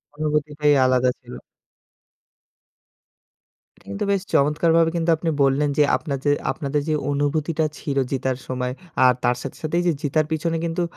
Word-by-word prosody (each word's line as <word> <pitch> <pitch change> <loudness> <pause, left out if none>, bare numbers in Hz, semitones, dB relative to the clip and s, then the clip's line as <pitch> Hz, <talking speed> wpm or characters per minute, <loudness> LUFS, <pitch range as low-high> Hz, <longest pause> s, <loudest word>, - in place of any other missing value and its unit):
অনুভূতিটাই 150 -1 +1
আলাদা 130 0 +3
ছিল। 125 -1 -13 2.4
এটা - - -25
কিন্তু 100 - -3
বেশ 195 -2 +1
চমৎকারভাবে 165 +3 +3
কিন্তু 170 0 0
আপনি 165 0 -2
বললেন 140 +2 +2
যে 150 - +6
আপনার 140 -3 -4
যে 145 - +4 0.2
আপনাদের 145 -1 -2
যে - - +2 0.2
অনুভূতিটা 155 +2 0
ছিল 140 -2 -3
জিতার 130 -1 -1
সময় 125 0 -3 0.3
আর 125 - +6
তার 125 - +2
সাথে - - -7
সাথেই 170 +3 0
যে - - +4
জিতার 155 +1 +1
পিছনে 165 +1 -1
কিন্তু 170 +1 -1
150 Hz, 150 wpm, -22 LUFS, 135-160 Hz, 2.4 s, যে